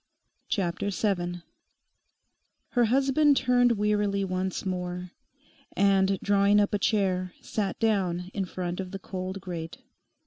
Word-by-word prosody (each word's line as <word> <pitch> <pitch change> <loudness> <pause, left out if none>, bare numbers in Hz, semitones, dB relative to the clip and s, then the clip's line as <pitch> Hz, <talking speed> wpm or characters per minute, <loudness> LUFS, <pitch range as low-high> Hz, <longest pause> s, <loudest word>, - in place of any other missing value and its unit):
CHAPTER 190 0 -1
SEVEN 175 -4 -1 1.3
Her 245 -2 +3
husband 275 +4 +3
turned 245 -1 +4
wearily 205 -2 +1
once 185 0 -2
more, 180 -1 -4 0.7
and 195 -1 +3
drawing 200 0 +4
up 205 0 +1
a 205 - +1
chair 185 -3 0
sat 200 -3 -3
down 185 -5 0
in 195 -2 -1
front 180 0 -4
of 190 -1 -4
the 195 - -5
cold 190 0 -5
grate. 170 -3 -6
195 Hz, 125 wpm, -27 LUFS, 180-210 Hz, 1.3 s, turned